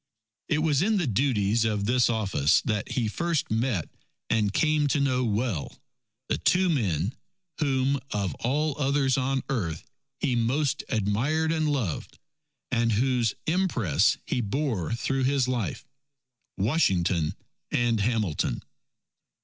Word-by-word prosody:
It 155 Hz, 0 st, +1 dB
was 150 Hz, -4 st, +2 dB
in 215 Hz, +3 st, +2 dB
the 180 Hz, -, +1 dB
duties 115 Hz, -3 st, +1 dB
of 105 Hz, -2 st, 0 dB
this 125 Hz, +2 st, +3 dB
office 100 Hz, -11 st, +2 dB
that 105 Hz, -3 st, -2 dB
he 120 Hz, -4 st, 0 dB
first 170 Hz, +5 st, -1 dB
met 110 Hz, -, 0 dB, 0.4 s
and 105 Hz, -3 st, +2 dB
came 150 Hz, +5 st, +2 dB
to 145 Hz, +1 st, +1 dB
know 130 Hz, -2 st, +1 dB
well 110 Hz, -, -2 dB, 0.5 s
the -, -, -1 dB
two 185 Hz, 0 st, +3 dB
men, 100 Hz, -, 0 dB, 0.5 s
whom 135 Hz, -2 st, +1 dB
of 100 Hz, -3 st, -2 dB
all 145 Hz, +4 st, 0 dB
others 135 Hz, -2 st, +2 dB
on 135 Hz, 0 st, 0 dB
earth 90 Hz, -, -2 dB, 0.4 s
he 130 Hz, -5 st, 0 dB
most 130 Hz, +5 st, 0 dB
admired 130 Hz, +9 st, 0 dB
and 155 Hz, -2 st, +1 dB
loved, 115 Hz, -, -3 dB, 0.5 s
and 115 Hz, -1 st, +2 dB
whose 120 Hz, -1 st, +1 dB
impress 160 Hz, -, +2 dB
he 125 Hz, -, -1 dB
bore 115 Hz, -, -2 dB
through 135 Hz, +2 st, -1 dB
his 135 Hz, -1 st, +2 dB
life 120 Hz, -10 st, -2 dB, 0.7 s
Washington 95 Hz, -, +1 dB, 0.4 s
and 120 Hz, -2 st, +1 dB
Hamilton. 105 Hz, -, 0 dB
125 Hz, 130 wpm, -27 LUFS, 105-140 Hz, 0.7 s, this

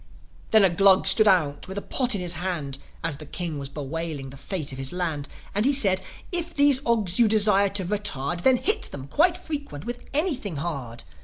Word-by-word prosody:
Then 220 Hz, -2 st, +5 dB
a 190 Hz, -, +7 dB
Glug 195 Hz, +1 st, +4 dB
stood 215 Hz, -1 st, +7 dB
out 155 Hz, -7 st, +1 dB
with 190 Hz, +1 st, -7 dB
a -, -, -2 dB
pot 250 Hz, -4 st, 0 dB
in 195 Hz, -, -3 dB
his 175 Hz, -1 st, -1 dB
hand, 160 Hz, -6 st, -4 dB, 0.2 s
As 145 Hz, -, -2 dB
the 155 Hz, -, -9 dB
King 165 Hz, -2 st, -4 dB
was 140 Hz, -1 st, -7 dB
bewailing 145 Hz, -1 st, -5 dB
the -, -, -11 dB
fate 150 Hz, +2 st, -5 dB
of 135 Hz, -, -9 dB
his 135 Hz, 0 st, -2 dB
land, 165 Hz, -5 st, -3 dB, 0.3 s
And 205 Hz, -, 0 dB
he 275 Hz, +3 st, +2 dB
said, 195 Hz, -8 st, +2 dB, 0.3 s
"If 340 Hz, -2 st, +2 dB
these 285 Hz, -2 st, +4 dB
Ogs 215 Hz, -6 st, +1 dB
you 235 Hz, -, +5 dB
desire 210 Hz, -2 st, +4 dB
to 195 Hz, -1 st, -2 dB
retard, 175 Hz, -5 st, -2 dB
Then 260 Hz, +3 st, +4 dB
hit 425 Hz, -, +1 dB
them 135 Hz, -2 st, -8 dB
quite 340 Hz, -, +2 dB
frequent 285 Hz, -, -6 dB
with 240 Hz, 0 st, -5 dB
anything 275 Hz, -, 0 dB
hard." 140 Hz, -7 st, -5 dB
185 Hz, 210 wpm, -24 LUFS, 150-230 Hz, 0.3 s, a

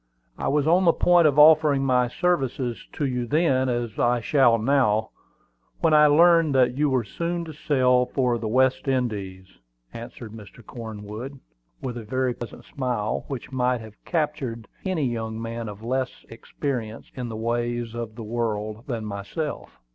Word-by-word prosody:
I -, -, -3 dB
was 145 Hz, 0 st, +2 dB
on 175 Hz, +4 st, +4 dB
the 170 Hz, -, +6 dB
point 175 Hz, -2 st, +4 dB
of 145 Hz, -1 st, +1 dB
offering 150 Hz, -2 st, +6 dB
my 125 Hz, -2 st, +3 dB
services 130 Hz, -6 st, -1 dB
to 145 Hz, -, -2 dB
you 125 Hz, -2 st, -2 dB
then, 135 Hz, -3 st, +2 dB
as 120 Hz, -3 st, -3 dB
I 120 Hz, 0 st, +2 dB
shall 120 Hz, -1 st, +4 dB
now, 110 Hz, -3 st, +2 dB, 0.7 s
when 165 Hz, -2 st, +3 dB
I 150 Hz, 0 st, +7 dB
learned 165 Hz, -1 st, +5 dB
that 125 Hz, -1 st, +3 dB
you 150 Hz, +1 st, +2 dB
were 130 Hz, -3 st, +1 dB
soon 170 Hz, -, -3 dB
to 160 Hz, -, -8 dB
sail 125 Hz, -4 st, +2 dB
for 125 Hz, -3 st, 0 dB
the 110 Hz, -, -3 dB
West 130 Hz, +4 st, +2 dB
Indies," 105 Hz, -8 st, -2 dB, 0.5 s
answered 115 Hz, -1 st, -9 dB
Mr. 110 Hz, +1 st, -13 dB
Cornwood, 110 Hz, +3 st, -8 dB, 0.4 s
with 125 Hz, -2 st, -4 dB
a -, -, -8 dB
very 130 Hz, +3 st, -1 dB
pleasant 120 Hz, -1 st, -9 dB
smile, 120 Hz, -6 st, -2 dB
which 135 Hz, -2 st, -6 dB
might 125 Hz, -2 st, 0 dB
have 110 Hz, -1 st, -13 dB
captured 145 Hz, -9 st, -2 dB, 0.2 s
any 180 Hz, -6 st, 0 dB
young 110 Hz, -2 st, -3 dB
man 115 Hz, -1 st, -5 dB
of 105 Hz, +1 st, -10 dB
less 130 Hz, +2 st, -3 dB
experience 115 Hz, -1 st, -5 dB
in 125 Hz, -2 st, -5 dB
the 110 Hz, -, -5 dB
ways 120 Hz, 0 st, -2 dB
of 115 Hz, -2 st, -6 dB
the 115 Hz, -, -7 dB
world 110 Hz, 0 st, -3 dB
than 115 Hz, -5 st, -3 dB
myself. 105 Hz, -, -5 dB
125 Hz, 165 wpm, -24 LUFS, 115-140 Hz, 0.7 s, I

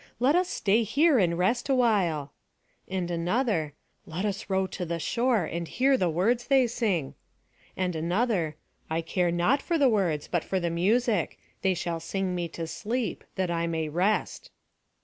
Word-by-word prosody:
Let 265 Hz, +6 st, +3 dB
us 360 Hz, 0 st, +2 dB
stay 210 Hz, +3 st, +2 dB
here 280 Hz, -, +3 dB
and 170 Hz, -3 st, +2 dB
rest 235 Hz, +9 st, +1 dB
awhile." 195 Hz, -, +2 dB, 0.5 s
And 185 Hz, -2 st, -3 dB
another, 175 Hz, -, 0 dB, 0.3 s
"Let 175 Hz, +5 st, -3 dB
us 205 Hz, 0 st, -3 dB
row 190 Hz, 0 st, +2 dB
to 185 Hz, 0 st, -5 dB
the 170 Hz, -1 st, -2 dB
shore, 235 Hz, +3 st, +1 dB
and 170 Hz, +1 st, -4 dB
hear 265 Hz, +7 st, +2 dB
the 185 Hz, -8 st, +1 dB
words 225 Hz, +9 st, +1 dB
they 270 Hz, -2 st, +5 dB
sing." 210 Hz, -, -1 dB, 0.6 s
And 180 Hz, -2 st, -1 dB
another, 175 Hz, -1 st, 0 dB, 0.3 s
"I 160 Hz, +1 st, 0 dB
care 175 Hz, +2 st, 0 dB
not 175 Hz, +12 st, +2 dB
for 340 Hz, -, 0 dB
the 280 Hz, -4 st, +4 dB
words, 180 Hz, -9 st, 0 dB
but 175 Hz, -3 st, -1 dB
for 190 Hz, -, -1 dB
the 170 Hz, -1 st, -1 dB
music. 205 Hz, +2 st, +1 dB, 0.2 s
They 190 Hz, -1 st, +2 dB
shall 170 Hz, -1 st, -3 dB
sing 190 Hz, +2 st, -2 dB
me 175 Hz, -1 st, -2 dB
to 165 Hz, 0 st, -6 dB
sleep, 220 Hz, +9 st, -3 dB
that 185 Hz, -2 st, -1 dB
I 170 Hz, 0 st, 0 dB
may 160 Hz, -2 st, -2 dB
rest." 185 Hz, +7 st, 0 dB
185 Hz, 170 wpm, -27 LUFS, 170-235 Hz, 0.6 s, they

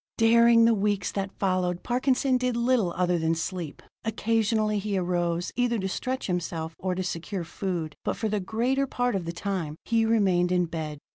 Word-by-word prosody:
Daring 230 Hz, 0 st, +6 dB
the 230 Hz, -, +5 dB
weeks 205 Hz, -2 st, 0 dB
that 195 Hz, 0 st, -4 dB
followed, 185 Hz, -2 st, 0 dB
Parkinson 255 Hz, +1 st, +1 dB
did 250 Hz, -1 st, 0 dB
little 235 Hz, -6 st, +2 dB
other 180 Hz, -1 st, +2 dB
than 160 Hz, 0 st, +1 dB
sleep. 165 Hz, -1 st, -5 dB, 0.2 s
Occasionally 220 Hz, -1 st, +1 dB
he 200 Hz, -1 st, -2 dB
arose, 175 Hz, -1 st, -1 dB
either 240 Hz, -1 st, +1 dB
to 190 Hz, -2 st, -2 dB
stretch 255 Hz, +7 st, -3 dB
himself, 165 Hz, -3 st, -3 dB
or 185 Hz, -1 st, -1 dB
to 185 Hz, -, -2 dB
secure 180 Hz, +1 st, -4 dB
food, 170 Hz, -3 st, -4 dB
but -, -, -2 dB
for 220 Hz, -, -1 dB
the 210 Hz, -1 st, 0 dB
greater 245 Hz, +8 st, 0 dB
part 245 Hz, -1 st, 0 dB
of 185 Hz, -3 st, -2 dB
the 170 Hz, -, -3 dB
time 170 Hz, -4 st, -3 dB
he 230 Hz, -1 st, +2 dB
remained 190 Hz, -6 st, +3 dB
in 180 Hz, -1 st, +3 dB
bed. 160 Hz, -2 st, -5 dB
195 Hz, 185 wpm, -27 LUFS, 175-230 Hz, 0.2 s, Daring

